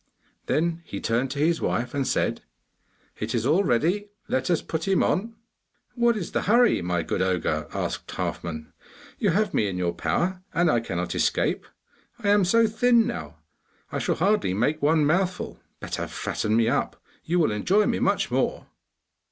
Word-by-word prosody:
Then 170 Hz, +2 st, 0 dB
he 100 Hz, -11 st, -6 dB
turned 120 Hz, +4 st, 0 dB
to 140 Hz, -, -5 dB
his 165 Hz, +3 st, +2 dB
wife 120 Hz, +1 st, -1 dB
and 140 Hz, -2 st, -1 dB
said: -, -, 0 dB, 0.8 s
'It -, -, -2 dB
is 115 Hz, -1 st, 0 dB
all 160 Hz, +9 st, +3 dB
ready, 180 Hz, -, +1 dB, 0.2 s
let 130 Hz, +4 st, -1 dB
us 175 Hz, -, +1 dB
put 160 Hz, +2 st, -3 dB
him 195 Hz, -1 st, +3 dB
on!' 225 Hz, +4 st, 0 dB, 0.6 s
'What 235 Hz, -2 st, +2 dB
is 180 Hz, -, -5 dB
the -, -, 0 dB
hurry, 235 Hz, -, +4 dB
my 90 Hz, -1 st, -1 dB
good -, -, -2 dB
ogre?' 95 Hz, -1 st, 0 dB
asked -, -, -4 dB
Halfman. 80 Hz, -2 st, -5 dB, 0.5 s
'You 205 Hz, -, +2 dB
have 205 Hz, +3 st, +1 dB
me 105 Hz, -, +2 dB
in 95 Hz, -2 st, -3 dB
your 90 Hz, -1 st, 0 dB
power, 180 Hz, -, -1 dB
and 170 Hz, -1 st, +3 dB
I 120 Hz, -, +3 dB
cannot 90 Hz, -6 st, -3 dB
escape. -, -, 0 dB, 0.5 s
I 210 Hz, -4 st, -1 dB
am 205 Hz, -2 st, +5 dB
so 230 Hz, +5 st, +4 dB
thin 230 Hz, +1 st, +3 dB
now, 80 Hz, 0 st, -5 dB, 0.5 s
I -, -, -2 dB
shall -, -, 0 dB
hardly 195 Hz, -, +1 dB
make 145 Hz, +9 st, 0 dB
one 150 Hz, +1 st, +3 dB
mouthful. 180 Hz, +4 st, 0 dB, 0.2 s
Better -, -, -4 dB
fatten 110 Hz, 0 st, -2 dB
me 115 Hz, 0 st, +3 dB
up; 135 Hz, +5 st, -1 dB, 0.2 s
you 175 Hz, +2 st, 0 dB
will 160 Hz, -9 st, +3 dB
enjoy 190 Hz, -, +2 dB
me -, -, 0 dB
much -, -, +1 dB
more. -, -, 0 dB
160 Hz, 175 wpm, -25 LUFS, -, 0.8 s, am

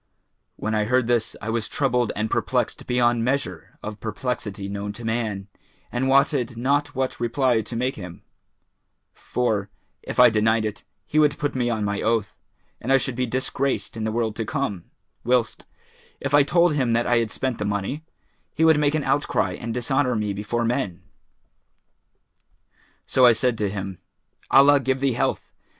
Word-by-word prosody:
When 110 Hz, -, -3 dB
I 105 Hz, -1 st, +1 dB
heard 125 Hz, +2 st, +2 dB
this, 120 Hz, -1 st, 0 dB
I 115 Hz, -, -2 dB
was 115 Hz, -2 st, -1 dB
troubled 125 Hz, -4 st, 0 dB
and 110 Hz, +1 st, -1 dB
perplexed -, -, -1 dB
beyond 120 Hz, -1 st, +2 dB
measure 135 Hz, +3 st, -2 dB
of 105 Hz, 0 st, -6 dB
perplexity 105 Hz, -3 st, -4 dB
known 100 Hz, +1 st, -4 dB
to 115 Hz, +2 st, -8 dB
man 110 Hz, -4 st, -2 dB, 0.4 s
and 125 Hz, +2 st, -1 dB
wotted 135 Hz, -3 st, +2 dB
not 140 Hz, +4 st, 0 dB
what 130 Hz, 0 st, -2 dB
reply 120 Hz, 0 st, +1 dB
to 115 Hz, -, -8 dB
make 125 Hz, +3 st, -1 dB
him; 90 Hz, -4 st, -9 dB, 0.9 s
for, 105 Hz, -5 st, -1 dB, 0.3 s
if -, -, -5 dB
I 125 Hz, -2 st, +8 dB
denied 110 Hz, +1 st, +2 dB
it, 105 Hz, -1 st, -5 dB, 0.2 s
he 155 Hz, -, +1 dB
would 150 Hz, -2 st, +3 dB
put 145 Hz, -3 st, -2 dB
me 125 Hz, -2 st, 0 dB
on 110 Hz, -3 st, -1 dB
my 100 Hz, 0 st, -1 dB
oath, 110 Hz, -2 st, 0 dB, 0.5 s
and 125 Hz, -, -2 dB
I 135 Hz, -, +7 dB
should 130 Hz, -1 st, -2 dB
be 125 Hz, 0 st, -1 dB
disgraced 130 Hz, +2 st, -1 dB
in 110 Hz, -, -4 dB
the 110 Hz, -, -1 dB
world 110 Hz, -1 st, -1 dB
to 115 Hz, -, -1 dB
come; 110 Hz, -, -3 dB, 0.4 s
whilst, 120 Hz, -2 st, 0 dB, 0.5 s
if 140 Hz, 0 st, -4 dB
I 145 Hz, -, +7 dB
told 170 Hz, +3 st, +3 dB
him 130 Hz, -5 st, +1 dB
that 120 Hz, +1 st, +2 dB
I 120 Hz, -, +3 dB
had 115 Hz, -2 st, +1 dB
spent 130 Hz, +2 st, -3 dB
the 105 Hz, -, -2 dB
money, 100 Hz, +9 st, -2 dB, 0.5 s
he 160 Hz, -, +3 dB
would 160 Hz, -2 st, +5 dB
make 145 Hz, 0 st, +2 dB
an 155 Hz, -, 0 dB
outcry 145 Hz, +1 st, +1 dB
and 115 Hz, -1 st, -5 dB
dishonour 125 Hz, +2 st, 0 dB
me 105 Hz, -2 st, -1 dB
before 105 Hz, +4 st, -2 dB
men. 115 Hz, -7 st, -2 dB, 2.0 s
So 130 Hz, -, +2 dB
I 120 Hz, -, +7 dB
said 125 Hz, +1 st, +1 dB
to 105 Hz, -2 st, 0 dB
him, 95 Hz, -2 st, -5 dB, 0.5 s
'Allah 140 Hz, +1 st, +7 dB
give 130 Hz, 0 st, 0 dB
thee 135 Hz, -1 st, +1 dB
health! -, -, -1 dB
120 Hz, 175 wpm, -24 LUFS, 110-135 Hz, 2.0 s, I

